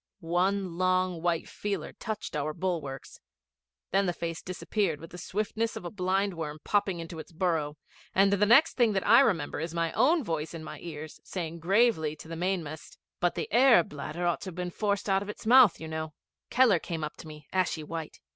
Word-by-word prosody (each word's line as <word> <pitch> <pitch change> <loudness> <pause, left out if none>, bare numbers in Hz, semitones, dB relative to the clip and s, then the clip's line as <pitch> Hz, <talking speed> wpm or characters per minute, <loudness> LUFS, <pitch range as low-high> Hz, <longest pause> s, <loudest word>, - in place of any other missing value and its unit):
One 180 +1 0
long 185 -2 +1
white 170 -1 0
feeler 205 -1 -4
touched 215 -7 -5
our 150 +1 -2
bulwarks. 160 -8 -4 0.7
Then 195 +1 +2
the 175 - +1
face 165 -1 -4
disappeared 185 -3 -2
with 165 - -11
the 180 - -8
swiftness 215 +5 -2
of - - -7
a 175 - -4
blindworm 185 -5 -1
popping 200 -4 +1
into 165 0 -7
its 160 - -9
burrow, 160 -3 -1 0.4
and 195 +1 +5
the 200 +1 +2
next 275 +9 +6
thing 235 -4 +4
that 190 - -1
I 230 +3 +8
remember 180 - +1
is 165 +2 -4
my 165 -1 0
own 295 +7 +3
voice 160 -4 -3
in 160 - -7
my 155 - -8
own - - -12
ears, 155 -2 -7
saying 170 -2 -5
gravely 180 -4 +2
to 155 - -12
the 165 - -6
mainmast, 165 -3 -3 0.2
'But 175 0 +1
the - - -2
air 240 -6 +7
bladder 155 +4 -5
ought 175 - 0
to - - -7
have 185 - -6
been 180 0 -3
forced 205 +1 -1
out 195 -1 +2
of 205 - -6
its 210 - -8
mouth, 245 -4 +7
you 160 - -6
know.' 160 0 -4 0.4
Keller 235 -8 +5
came 160 -1 -5
up 150 - -4
to - - -10
me, 150 -2 -11
ashy 180 -4 0
white. 160 0 -6
175 Hz, 205 wpm, -29 LUFS, 160-200 Hz, 0.7 s, I